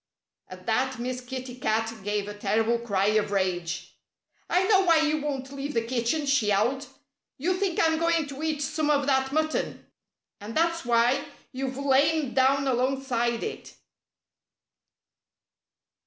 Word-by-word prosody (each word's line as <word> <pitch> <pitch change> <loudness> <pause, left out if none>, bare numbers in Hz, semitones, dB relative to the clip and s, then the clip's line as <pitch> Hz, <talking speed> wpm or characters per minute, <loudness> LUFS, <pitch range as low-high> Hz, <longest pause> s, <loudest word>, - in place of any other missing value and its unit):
At 185 0 -12
that 260 +3 0
Miss 250 +1 -4
Kitty 255 0 -7
Cat 225 -1 0
gave 205 0 -1
a 205 - -5
terrible 225 +3 +1
cry 200 -5 0
of 215 -1 +1
rage. 180 -4 -2 0.6
"I 360 - +3
know 390 0 +4
why 335 -3 +4
you 305 -1 +1
won't 270 -2 -4
leave 280 +1 -5
the 230 - +2
kitchen!" 250 +5 -1
she 275 -6 +2
yowled. 225 +7 +1 0.5
"You 345 +7 0
think 370 -2 -1
I'm 320 -1 +3
going 335 -1 +2
to 280 0 -8
eat 310 -2 -1
some 305 +1 -1
of 285 -2 +2
that 265 -1 +1
mutton. 310 +1 -1 0.5
And 215 +5 -6
that's 335 -1 +1
why 240 +2 +3 0.3
you've 265 0 -4
lain 280 +1 +2
down 270 +1 +3
alongside 250 -2 0
it." 440 - -6
265 Hz, 145 wpm, -26 LUFS, 230-300 Hz, 0.6 s, know